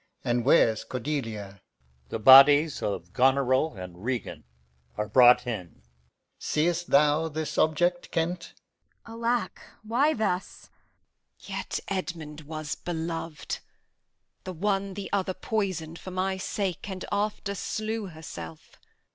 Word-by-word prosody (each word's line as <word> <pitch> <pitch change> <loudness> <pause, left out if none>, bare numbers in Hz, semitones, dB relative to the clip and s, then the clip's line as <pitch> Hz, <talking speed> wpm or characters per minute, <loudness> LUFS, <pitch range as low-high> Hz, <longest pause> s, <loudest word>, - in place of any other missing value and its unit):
and 120 -1 0
where's 115 -7 +4
Cordelia? 115 -7 -4 0.5
The - - -3
bodies 140 +6 +8
of 90 -3 -4
Goneril 130 +1 +2
and 90 -1 -9
Regan 125 - -4 0.5
are 105 0 -1
brought 125 +3 +6
in. 90 - -6 0.6
Seest 170 +3 0
thou 150 +3 +4
this 155 0 -4
object, 175 +3 +1
Kent? 170 +2 -1
Kent. - - -13 0.5
Alack, 230 +1 -2 0.2
why 260 +8 +2
thus? 195 -4 -3 0.7
Edm. - - -12
Yet - - -3
Edmund 165 -5 -4
was 155 0 -4
belov'd. 165 -2 -4 0.8
The 185 - -6
one 195 +2 -1
the 200 -1 -5
other 190 -2 0
poisoned 180 -7 -3
for - - -8
my 185 +1 -1
sake, 190 0 -3
And 190 -1 -5
after 205 0 -1
slew 215 +1 -3
herself. 85 - -10
160 Hz, 120 wpm, -27 LUFS, 130-190 Hz, 0.8 s, bodies